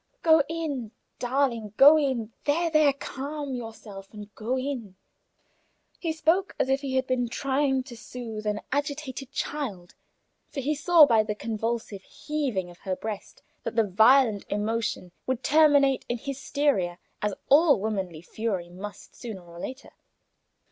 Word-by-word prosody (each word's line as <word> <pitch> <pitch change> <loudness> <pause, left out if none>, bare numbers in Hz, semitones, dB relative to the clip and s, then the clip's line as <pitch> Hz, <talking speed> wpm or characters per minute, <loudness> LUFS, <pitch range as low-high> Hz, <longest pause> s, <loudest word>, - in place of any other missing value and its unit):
"Go 320 -2 +6
in, 285 -9 -3 0.3
darling, 240 -5 0
go 290 +3 +9
in! 260 -7 0
There, 330 +3 +1
there, 305 -2 +5
calm 280 +1 -5
yourself, 220 -5 -8
and 210 -1 -10
go 240 +4 -2
in." 255 -7 -4 1.0
He 330 - -1
spoke 330 +4 +1
as 260 - 0
if 270 +1 +2
he 270 -2 -3
had 260 0 +2
been 255 -2 0
trying 265 +1 0
to 245 - -10
soothe 220 -1 -7
an 210 0 -1
agitated 285 -2 -3
child, 210 -13 -4 0.6
for 280 - -5
he 280 +3 0
saw 320 +1 +7
by 230 -5 +4
the 210 -1 -3
convulsive 225 -2 -3
heaving 255 -11 -3
of 175 - -17
her 190 -2 -3
breast 215 0 -7 0.2
that - - -5
the 225 -2 +4
violent 220 +2 +5
emotion 210 -3 -2 0.2
would 260 -1 -1
terminate 285 -3 +4
in 240 - 0
hysteria, 275 -8 -1 0.2
as 210 -2 -1
all 290 - +6
womanly 190 -6 -3
fury 190 -3 -3
must, 200 +3 -9
sooner 220 -7 -7
or 170 0 -12
later. 260 +8 -7
250 Hz, 150 wpm, -27 LUFS, 210-285 Hz, 1.0 s, go